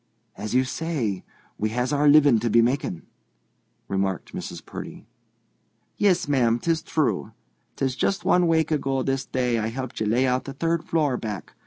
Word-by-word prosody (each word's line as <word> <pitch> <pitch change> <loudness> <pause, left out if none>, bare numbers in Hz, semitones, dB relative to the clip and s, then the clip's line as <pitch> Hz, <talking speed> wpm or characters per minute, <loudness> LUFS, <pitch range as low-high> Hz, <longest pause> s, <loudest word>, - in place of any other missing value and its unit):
"As 105 +3 -4
you 130 - +5
say, 130 - -2 0.4
we 110 - 0
has 125 +3 0
our 145 +1 +3
living 145 -5 +6
to 120 +2 -1
be 115 +2 +5
making," 120 -9 -1 0.8
remarked 95 -2 -2
Mrs. - - -7
Purdy. - - -8 0.9
"Yis, 185 -6 +2
ma'am; 120 -5 +3
'tis 165 +5 0
true. 155 -2 -1 0.4
'Tis 130 -2 -1
just 195 +7 -1
one 180 -1 +4
wake 160 -1 +2
ago 135 -3 0
this 135 0 -1
day 125 -3 0
I 110 - -1
helped 130 +2 -5
ye 110 - +1
lay 120 +5 +2
out 125 0 0
the 135 - -6
third 165 +3 -1
floor, 150 -6 +1
back. 105 -5 -6
130 Hz, 170 wpm, -24 LUFS, 115-150 Hz, 0.9 s, living